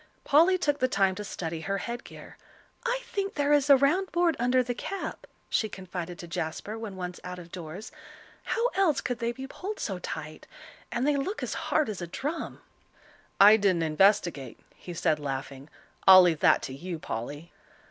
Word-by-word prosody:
Polly 335 +6 +5
took 290 -5 0
the 255 - +3
time 195 -6 +2
to 210 - -6
study 165 -4 -5
her 195 +4 -2
headgear. 235 +5 -7 0.5
"I - - -1
think 395 -2 -3
there 290 0 +2
is 290 -1 +3
a 280 - +9
round 320 +8 +2
board 345 -2 +2
under 250 +1 +3
the 245 0 -2
cap," 390 +10 -6 0.2
she 220 - 0
confided 180 -3 -6
to 175 - -9
Jasper 170 +5 -4
when 225 -3 -6
once 180 -1 -6
out 180 0 -6
of 175 -1 -11
doors; 180 +4 -8 0.5
"how 465 - 0
else 360 -7 +2
could 245 -1 -3
they 235 -1 0
be 265 +2 -7
pulled 395 +9 -6
so 190 -4 -3
tight? 155 -3 -7 0.4
And 240 +2 -1
they 295 -1 +2
look 375 +10 -3
as - - -3 0.2
hard 310 - +2
as 205 -4 -5
a 175 - -4
drum." 295 - -5 0.8
"I 210 +2 +9
didn't 190 -5 +2
investigate," 160 - +2
he 175 - -9
said, 155 -1 +1
laughing. 135 0 -5 0.4
"I'll 185 -1 +11
leave 170 -4 +2
that - - +4
to 130 - -5
you, 170 +5 -5
Polly." 145 +4 -6
200 Hz, 185 wpm, -28 LUFS, 170-280 Hz, 0.8 s, I'll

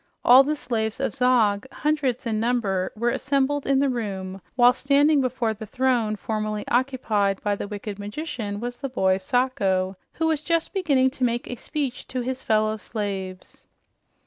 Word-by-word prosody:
All 255 +2 +9
the 300 +2 -1
slaves 230 -5 -2
of - - -1
Zog, 245 -3 +2
hundreds 290 -5 -1
in 220 -2 -1
number, 215 -6 0
were 235 +2 0
assembled 275 +2 0
in 275 -1 +3
the 280 +1 +3
room, 195 -6 -4
while 245 0 +6
standing 280 +3 +3
before 250 -3 0
the 220 0 -9
throne 245 -4 +1
formerly 215 0 -3
occupied 230 -6 +1
by 205 -1 +1
the 200 - -5
wicked 205 0 -6
magician 210 -2 -5
was 245 +2 -5
the 275 - -4
boy 190 -6 +1
Sacho, 195 -4 0 0.2
who 325 - -1
was 320 -2 +1
just 335 +1 -1
beginning 280 -9 +2
to 260 - -5
make 240 -1 0
a 245 - -4
speech 275 +1 -4
to 255 - -3
his 260 +1 -3
fellow 215 0 +1
slaves. 195 -4 -6
240 Hz, 170 wpm, -24 LUFS, 210-265 Hz, 0.2 s, All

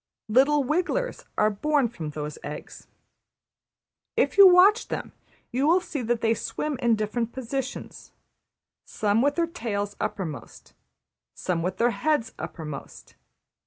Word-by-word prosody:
Little 275 +5 +4
wigglers 365 - -1
are 215 0 +3
born 285 +5 +1
from 170 -10 -6
those 150 0 -6
eggs. 150 - -8 1.3
If - - +2
you 400 -1 +10
watch 380 +5 +6
them - - -5 0.4
you 260 +4 +1
will 345 +3 +5
see 315 -6 -5
that 235 0 -1
they 225 0 +3
swim 290 +3 -3
in 235 -2 +3
different 220 +2 -2
positions, 260 +1 -5 0.7
some 210 +1 0
with 285 +2 +2
their 340 - +2
tails 205 - -4
uppermost, 155 - -5 0.6
some 175 -3 -2
with 185 +2 -2
their 240 +1 +3
heads 230 +1 0
uppermost. 150 -4 -8
235 Hz, 130 wpm, -26 LUFS, 205-300 Hz, 1.3 s, you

